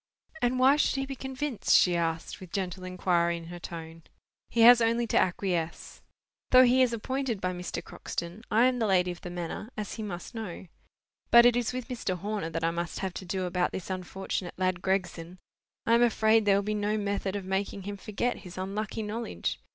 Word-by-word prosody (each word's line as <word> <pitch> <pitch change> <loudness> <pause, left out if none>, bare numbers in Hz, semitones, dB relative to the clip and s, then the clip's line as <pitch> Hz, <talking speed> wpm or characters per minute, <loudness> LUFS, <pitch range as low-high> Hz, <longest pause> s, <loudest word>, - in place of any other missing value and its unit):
"And 245 +1 +1
why 265 +3 +5
should 300 - +2
he 270 0 -1
be 270 0 -6
convinced?" 265 -1 0
she 180 -1 +4
asked, 165 -1 -2
with 185 -2 -11
gentle 185 -1 -3
inquiry 175 -2 +1
in 165 0 -10
her 175 - -7
tone. 165 -1 -8 0.5
"He 235 - +1
has 240 +1 +9
only 230 +1 +2
to - - -3
acquiesce. 175 -3 -2 0.5
Though 255 0 +8
he 255 +1 +5
is 255 -2 +4
appointed 250 0 -2
by 185 -1 -1
Mr. 180 0 -5
Croxton, 170 +5 -6
I 225 +3 +4
am 255 -1 +2
the 225 - +1
lady 180 -2 +3
of 175 - -9
the 180 - -6
manor, 175 +5 -5
as 210 -1 -4
he 225 - -6
must 190 -2 -6
know. 215 -5 -6 0.6
But 235 0 +8
it 245 -1 +6
is 245 -1 0
with 255 -1 -5
Mr. 230 -8 -3
Horner 200 -2 -3
that 165 0 -4
I 165 - +2
must 170 +1 -4
have 190 -2 -3
to 185 - -7
do 185 +1 -2
about 180 0 0
this 190 0 -5
unfortunate 185 0 -4
lad 185 -1 0
Gregson. 180 -2 -2 0.5
I 230 - +3
am 235 - +5
afraid 220 -2 +4
there 200 -1 +5
will 200 - +1
be 210 +1 -1
no 210 +1 0
method 200 -1 -2
of 200 -2 -4
making 190 +1 -2
him 205 +1 -5
forget 215 +5 -2
his 180 -2 -11
unlucky 200 +3 -3
knowledge. 225 +2 -3
195 Hz, 210 wpm, -29 LUFS, 180-230 Hz, 0.6 s, has